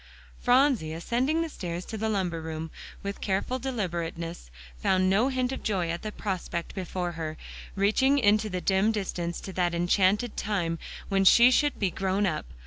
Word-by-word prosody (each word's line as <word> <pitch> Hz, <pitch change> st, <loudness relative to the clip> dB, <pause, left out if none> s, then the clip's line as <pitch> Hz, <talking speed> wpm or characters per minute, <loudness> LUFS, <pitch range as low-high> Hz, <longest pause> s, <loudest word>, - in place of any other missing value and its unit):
Phronsie, 245 Hz, -, +3 dB
ascending 255 Hz, -, 0 dB
the -, -, -3 dB
stairs 175 Hz, -, -5 dB
to 225 Hz, -, -6 dB
the 220 Hz, +1 st, -1 dB
lumber 180 Hz, -6 st, -1 dB
room, 160 Hz, 0 st, -5 dB, 0.3 s
with 200 Hz, 0 st, -5 dB
careful 200 Hz, +6 st, -1 dB
deliberateness, 170 Hz, -, -4 dB, 0.3 s
found 185 Hz, 0 st, +3 dB
no 215 Hz, +6 st, +3 dB
hint 255 Hz, -1 st, 0 dB
of 265 Hz, -, -4 dB
joy 180 Hz, -5 st, 0 dB
at 170 Hz, -, -4 dB
the 215 Hz, -, -4 dB
prospect 185 Hz, -5 st, -4 dB
before 180 Hz, -2 st, -3 dB
her, 160 Hz, -2 st, -5 dB, 0.4 s
reaching 220 Hz, +8 st, +3 dB
into 215 Hz, -3 st, +3 dB
the 180 Hz, -2 st, -3 dB
dim 195 Hz, +4 st, +3 dB
distance 180 Hz, -5 st, -3 dB
to 190 Hz, -, -7 dB
that 175 Hz, -2 st, 0 dB
enchanted 190 Hz, +6 st, +2 dB
time 170 Hz, -6 st, -1 dB, 0.3 s
when 195 Hz, -1 st, +2 dB
she 240 Hz, +6 st, +7 dB
should 290 Hz, +3 st, +2 dB
be 195 Hz, -3 st, 0 dB
grown 195 Hz, +2 st, 0 dB
up. 155 Hz, -, -2 dB
195 Hz, 170 wpm, -27 LUFS, 175-220 Hz, 0.4 s, she